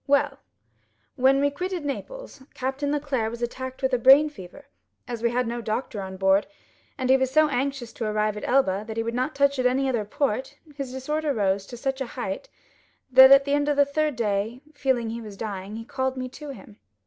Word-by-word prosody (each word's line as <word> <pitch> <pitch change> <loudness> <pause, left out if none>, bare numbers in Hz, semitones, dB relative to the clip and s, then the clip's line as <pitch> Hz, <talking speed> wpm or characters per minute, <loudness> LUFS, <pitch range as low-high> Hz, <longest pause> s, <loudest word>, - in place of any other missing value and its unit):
"Well, 280 0 +2 0.8
when 270 +1 +4
we 285 0 +2
quitted 360 +1 -4
Naples, - - -6
Captain 270 +2 -2
Leclere 280 -6 -1
was 235 +1 -6
attacked 260 +2 -5
with 265 0 +1
a 250 - +3
brain 275 +5 +7
fever. 270 +4 -12 0.4
As 240 -3 -5
we 235 - +2
had 250 +1 0
no 235 +1 -3
doctor 220 -1 -3
on 190 0 -7
board, 195 +1 +3 0.5
and 260 -2 -2
he 265 - +7
was 260 -1 0
so 310 +3 +4
anxious 270 -3 -2
to 230 - -4
arrive 215 0 0
at 210 - -5
Elba, 210 -7 +2
that 220 0 -6
he 225 - 0
would 230 +1 -3
not 255 +5 -1
touch 280 -1 +2
at 250 - +4
any 265 +2 +1
other 240 -5 0
port, 260 +3 -2 0.2
his 275 -3 -5
disorder 290 +3 -2
rose 195 -2 0
to 240 - -9
such 270 +2 -3
a 265 - -2
height, - - -4 0.6
that 260 +1 +9
at 275 0 +8
the 280 - 0
end 290 0 +1
of 290 - +1
the 285 - +6
third 300 0 -1
day, 220 +2 -1
feeling 260 -5 0
he 235 +1 -5
was 210 -3 -10
dying, 200 -1 -5
he 225 0 -7
called 260 +1 -2
me 255 0 -3
to 295 +3 -10
him. 220 -6 -11
260 Hz, 220 wpm, -25 LUFS, 225-280 Hz, 0.8 s, that